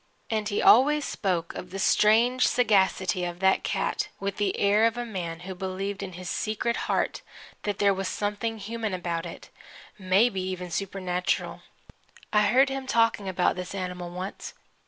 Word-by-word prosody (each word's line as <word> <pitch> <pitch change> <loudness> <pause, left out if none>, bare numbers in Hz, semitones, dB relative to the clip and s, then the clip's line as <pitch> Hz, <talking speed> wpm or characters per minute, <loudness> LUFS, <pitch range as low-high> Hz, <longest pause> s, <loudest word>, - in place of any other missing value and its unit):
And 215 -1 0
he 205 - -1
always 290 +5 +6
spoke 175 -5 -2
of 180 - -7
the 190 - -6
strange 225 +6 +4
sagacity 190 -6 +2
of 175 0 -4
that 190 0 +3
cat - - -1
with 200 0 -3
the 205 -2 0
air 205 +2 +4
of 230 +1 -3
a 240 - -3
man 175 -6 -5
who 190 +1 -6
believed 190 +2 -4
in 190 -2 -6
his 180 +1 -8
secret 220 +4 -1
heart - - 0 0.4
that 205 -2 -2
there 200 -2 +3
was 195 0 -3
something 210 +3 -2
human 220 -1 -4
about 175 -1 -3
it 170 - -11 0.5
maybe 190 +2 +2
even 185 -1 -5
supernatural. 185 0 -2 0.7
I 210 -1 +4
heard 265 +4 +4
him 270 -1 -4
talking 230 -5 +2
about 180 -1 +1
this 180 +1 -6
animal 180 -2 -4
once. 185 +3 -7
195 Hz, 165 wpm, -27 LUFS, 185-220 Hz, 0.7 s, always